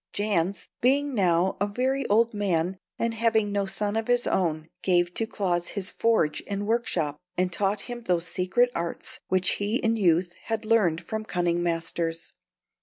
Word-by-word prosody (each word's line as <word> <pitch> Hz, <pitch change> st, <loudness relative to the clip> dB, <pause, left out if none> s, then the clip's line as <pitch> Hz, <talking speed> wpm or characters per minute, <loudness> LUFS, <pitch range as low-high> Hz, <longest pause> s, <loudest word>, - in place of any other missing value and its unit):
Jans, 200 Hz, -2 st, 0 dB
being 280 Hz, +3 st, +2 dB
now 185 Hz, -3 st, +2 dB
a 205 Hz, -, +3 dB
very 260 Hz, +5 st, 0 dB
old 225 Hz, +3 st, +3 dB
man, 185 Hz, -3 st, 0 dB, 0.2 s
and 230 Hz, 0 st, 0 dB
having 220 Hz, -2 st, +2 dB
no 200 Hz, -1 st, 0 dB
son 205 Hz, +2 st, -2 dB
of 225 Hz, 0 st, -1 dB
his 245 Hz, 0 st, +2 dB
own, 160 Hz, -4 st, 0 dB
gave 175 Hz, -1 st, +2 dB
to 225 Hz, -, -1 dB
Claus 175 Hz, -5 st, -1 dB
his 195 Hz, -2 st, -4 dB
forge 220 Hz, -10 st, +1 dB
and 200 Hz, 0 st, -2 dB
workshop, 205 Hz, -10 st, -1 dB, 0.2 s
and 180 Hz, 0 st, +1 dB
taught 200 Hz, +2 st, 0 dB
him 240 Hz, +1 st, -7 dB
those 180 Hz, -6 st, 0 dB
secret 190 Hz, +9 st, +2 dB
arts 170 Hz, 0 st, -3 dB
which 185 Hz, -1 st, +2 dB
he 205 Hz, +3 st, 0 dB
in 230 Hz, -2 st, +1 dB
youth 175 Hz, -3 st, +2 dB
had 225 Hz, -1 st, -2 dB
learned 205 Hz, -8 st, +3 dB
from 220 Hz, -1 st, -3 dB
cunning 175 Hz, -4 st, 0 dB
masters. 165 Hz, -1 st, -2 dB
200 Hz, 170 wpm, -26 LUFS, 175-225 Hz, 0.2 s, a